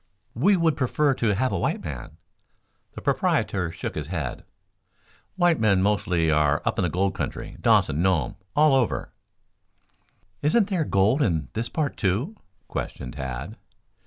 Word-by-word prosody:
"We 190 - +3
would 165 -3 +2
prefer 140 +2 +2
to 115 -5 0
have 130 +5 0
a - - -1
white - - -1
man." 65 -5 -7 0.8
The - - -8
proprietor 90 -4 0
shook - - -5
his 75 -2 -4
head. 80 -8 -4 0.9
"White 175 -3 +3
men 100 -4 +3
mostly 90 -5 +1
are 75 -1 +3
up - - 0
in - - +2
the 90 - +1
gold 95 +4 0
country, - - -5
Dawson, 75 +3 +3
Nome, 95 -1 +1 0.2
all 150 -1 +5
over." 130 -4 0 1.3
"Isn't 195 +8 +3
there 180 -6 0
gold 105 +8 +2
in 80 - 0
this 115 +2 -2
part, 155 -4 -2
too?" 115 - 0 0.3
questioned 60 - -5
Tad. 65 - -6
100 Hz, 150 wpm, -25 LUFS, -, 1.3 s, all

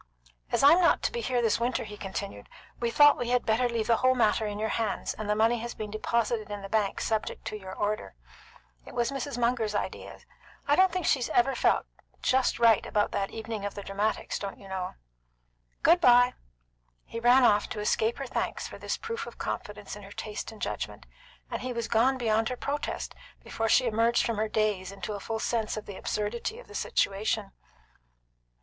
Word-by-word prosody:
"As - - +1
I'm 330 +6 +8
not 345 - +4
to - - +1
be 475 - -3
here 250 - 0
this 225 -1 +2
winter," 240 +2 0
he 210 -1 -8
continued, 195 - -6 0.3
"we 235 - 0
thought 290 +4 +6
we 240 - -2
had 250 0 +2
better 235 +3 +2
leave 230 -2 -1
the 230 0 +3
whole 255 0 +3
matter 220 -2 +2
in 205 0 -4
your 220 +1 -1
hands, 225 -3 -1
and 215 0 -6
the 210 - +3
money 225 +2 +3
has 235 +1 -5
been 210 -1 -6
deposited 220 0 -1
in 205 -1 -6
the 195 - -7
bank 210 -2 0
subject 220 -1 -2
to - - -4
your 190 -3 -8
order. 205 - -2 0.7
It - - -12
was 240 +2 +1
Mrs. 275 0 -4
Munger's 235 -3 +1
idea. - - -4 0.5
I 290 - +5
don't 375 +1 +5
think 365 0 -2
she's 260 -4 +2
ever 270 +3 +3
felt - - +2 0.4
just 260 0 +2
right 230 -3 +5
about 210 -1 0
that 195 0 -1
evening 220 -2 -5
of 205 - -4
the 200 - -6
dramatics, 200 +3 -2
don't 200 -1 -5
you 195 - -13
know. 190 -1 -4 0.9
Good 345 +2 +6
bye!" 245 -2 +6 0.7
He 230 - -6
ran 245 +2 +6
off 210 -3 +4
to 215 - -5
escape 220 +2 +1
her 275 - -4
thanks - - -3
for - - -10
this - - -2
proof 460 0 -5
of - - -10
confidence - - -5
in - - -10
her - - -12
taste - - -5
and - - -13
judgment, - - -4 0.5
and - - -3
he 255 0 -3
was 235 -1 -3
gone 250 +4 +3
beyond 225 -2 +1
her 250 - -4
protest 290 +3 -3 0.3
before 225 0 -2
she 255 - +5
emerged 230 +1 +2
from 230 -2 -1
her 215 +1 0
daze 210 -4 0
into 200 +2 -5
a 205 - -5
full 225 +3 -3
sense 220 -1 -1
of 215 - -6
the 200 - -8
absurdity 225 - -3
of - - -12
the - - -13
situation. 205 - 0
225 Hz, 210 wpm, -28 LUFS, 210-245 Hz, 0.9 s, I'm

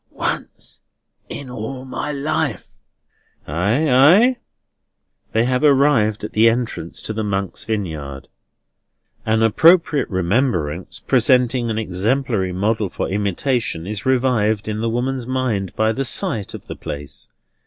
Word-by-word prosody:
"Once - - -4 0.5
in 140 - -7
all 125 +2 -6
my 145 +3 -4
life." 140 +1 -2 0.8
"Ay, 100 - +1
ay?" 175 - +6 0.9
They 115 +1 +2
have 125 +2 0
arrived 135 -8 +3
at 105 - -5
the 110 +2 +5
entrance 115 -8 -3
to 110 - -4
the 110 0 -2
Monks' 100 -2 -3
Vineyard. 75 -11 -4 1.0
An 110 0 +2
appropriate 160 - +4
remembrance, 95 - -1
presenting 125 -1 +2
an 110 - -2
exemplary 110 0 0
model 105 +2 0
for - - -3
imitation, 100 - -1
is 100 +1 -4
revived 120 -5 +1
in 110 0 -3
the 115 - 0
woman's 125 +1 -2
mind 125 -8 -1
by 110 0 +2
the 135 +5 -2
sight 110 -5 -1
of - - -10
the - - -7
place. 70 -1 -8
115 Hz, 130 wpm, -20 LUFS, 100-130 Hz, 1.0 s, ay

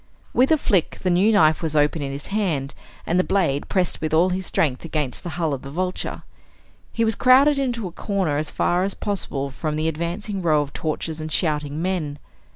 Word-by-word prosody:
With 260 +5 +3
a 315 - +6
flick 200 - +1
the 185 - +2
new 190 +5 +4
knife 160 -7 +4
was 160 -2 -2
open 150 +1 +2
in 140 -1 -3
his 140 +1 -6
hand 160 -10 -1 0.3
and 175 +2 +1
the - - +4
blade 165 -9 0
pressed 185 -3 0
with 155 0 0
all 175 +3 +4
his 185 0 -2
strength 135 -5 0
against 150 -5 -3
the 175 - -6
hull 160 -4 0
of 135 - -4
the 135 - -8
Vulture. 180 +5 -3 0.7
He 230 - +1
was 220 - +2
crowded 275 +5 +5
into 240 -6 -1
a - - -8
corner 185 -5 -1
as 150 0 -2
far 175 +1 +1
as 195 0 -2
possible 145 -9 -3
from 150 +2 -3
the 155 +1 0
advancing 175 +6 -3
row 155 -4 +3
of 145 - -11
torches 160 0 -3
and 155 0 -5
shouting 150 -2 0
men. 170 -6 -2
165 Hz, 210 wpm, -23 LUFS, 150-195 Hz, 0.7 s, a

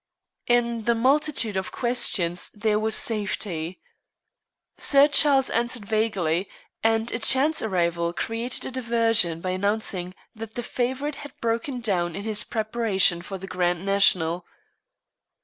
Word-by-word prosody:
In 235 -2 +1
the 235 - +2
multitude 265 -2 +1
of 190 0 -3
questions 210 -8 0
there 210 0 0
was 220 0 +1
safety. 190 -5 -2 1.0
Sir 280 0 +5
Charles 285 -2 +3
answered 235 -1 -2
vaguely, 200 -5 -1 0.3
and 225 +1 +1
a 230 - -2
chance 275 +6 +4
arrival 170 -4 -1
created 225 +7 -2
a - - -5
diversion 230 -8 +1
by 185 - -2
announcing 185 -2 -2 0.2
that 220 0 -9
the 240 - -4
favorite 260 +5 -3
had 290 - -11
broken 235 +3 -2
down 175 -6 -1
in 200 - -6
his 215 -1 +1
preparation 215 -6 +1
for 195 +2 -7
the 190 - -9
Grand 180 -1 -1
National. 180 -4 +3
220 Hz, 130 wpm, -24 LUFS, 185-240 Hz, 1.0 s, Sir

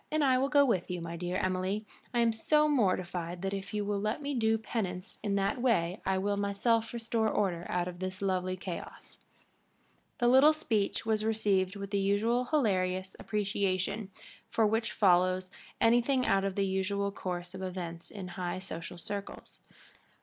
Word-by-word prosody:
"And 310 -1 +2
I 260 -2 +4
will 270 +1 +1
go 285 -1 +5
with 195 -9 0
you, 180 -1 -2
my 170 0 -5
dear 175 +1 -3
Emily. 185 +3 -1 0.3
I 240 -2 +2
am 230 -1 +3
so 300 +7 +3
mortified 185 - 0
that 195 0 -1
if 195 -1 -5
you 210 -1 -2
will 205 0 -1
let 215 +5 -1
me 285 -1 -3
do 225 -3 +2
penance 205 -3 -4
in 205 -2 -1
that 200 +6 0
way 190 -7 +1
I 190 0 +2
will 200 +1 0
myself 220 +3 +1
restore 230 -1 0
order 180 -5 -1
out 175 0 0
of 175 -1 -7
this 185 0 -4
lovely 185 -1 -1
chaos." 180 -1 -8 1.0
The 240 - +2
little 265 +5 +7
speech 225 -12 -1
was 215 -1 +1
received 205 -3 +1
with 200 -1 -6
the 200 - +1
usual 215 +5 +2
hilarious 185 -9 0
appreciation 200 -1 -1 0.5
which 220 0 +2
follows 185 -1 +3 0.3
anything 245 +3 +3
out 195 0 +2
of 195 -1 -2
the 200 - +1
usual 195 +1 0
course 180 -2 -5
of 190 - -7
events 175 -3 -5
in 195 -3 -7
high 180 -1 -3
social 175 -2 -7
circles. 200 +4 -7
200 Hz, 170 wpm, -31 LUFS, 185-225 Hz, 1.0 s, little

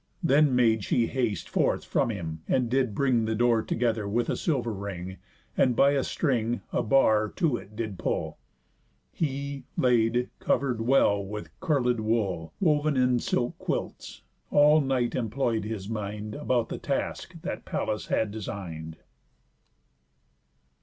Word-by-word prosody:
Then 145 -3 +4
made 110 -4 +3
she 120 +3 +2
haste 115 -9 -2
forth - - 0
from - - +1
him, 80 -7 -5
and 125 -3 +1
did 130 -5 +1
bring 125 -4 +2
The 110 0 -1
door 120 0 +3
together 115 -3 -1
with 120 +4 0
a - - 0
silver 125 -9 -1
ring, 95 -2 -6 0.4
And 125 -2 +3
by 140 +4 +5
a 140 -2 +1
string 120 -6 0
a - - +2
bar 110 -3 +3
to 165 -9 +1
it 105 - -13
did 110 -4 -4
pull. - - -2 0.7
He, 140 -2 -3
laid, 120 -2 +3
and 125 - -1
cover'd 125 -5 0
well 115 -5 +3
with 105 +2 -7
curled 130 -9 +1
wool 100 -8 -1
Wov'n 150 -4 +2
in 125 -1 +3
silk 120 +1 -1
quilts, - - -4 0.3
all 150 +1 +6
night 130 -3 0
employ'd 115 -2 -1
his 105 -3 -5
mind 105 -1 -4
About 125 -4 0
the - - -5
task - - -3
that - - -4
Pallas 105 - -2
had 110 -2 0
design'd. 85 -7 -6
115 Hz, 145 wpm, -27 LUFS, 105-130 Hz, 0.7 s, all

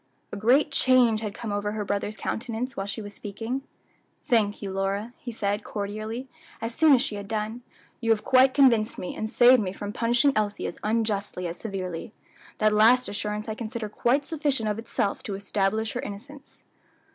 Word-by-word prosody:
A - - -4
great 250 +9 +3
change 255 -5 +4
had 210 -2 -4
come 220 - -5
over 205 +1 -1
her 210 -1 -3
brother's 205 +2 -2
countenance 240 +3 -3
while 195 - -3
she 210 +2 -5
was 205 0 -8
speaking. 225 +6 -4 0.6
"Thank 220 -6 +2
you, 200 -2 -5
Lora," 195 +4 -2
he 245 - -6
said, 205 -1 -1
cordially, 215 +4 -4 0.3
as 230 +1 -3
soon 310 +1 +6
as 250 - +2
she 210 - -4
had 200 -1 -7
done, 220 +2 -3 0.4
"you 230 - -2
have 220 -2 +3
quite 260 0 +5
convinced 235 -6 +4
me, 180 - -5
and 220 - -3
saved 245 +1 +6
me 185 -3 -2
from 205 +1 -6
punishing 240 +5 +2
Elsie 210 -1 -1
as - - -5
unjustly 210 -4 -1
as 170 0 -4
severely. 190 -2 -5 0.4
That 215 0 +3
last 230 +4 +5
assurance 210 +1 -3
I 220 - -2
consider 220 -1 -5
quite 260 +7 +1
sufficient 285 -8 -1
of 210 +1 -2
itself 215 -3 -2
to 200 - -4
establish 200 +2 -1
her - - -2
innocence." 270 +8 -10
220 Hz, 185 wpm, -26 LUFS, 205-240 Hz, 0.6 s, soon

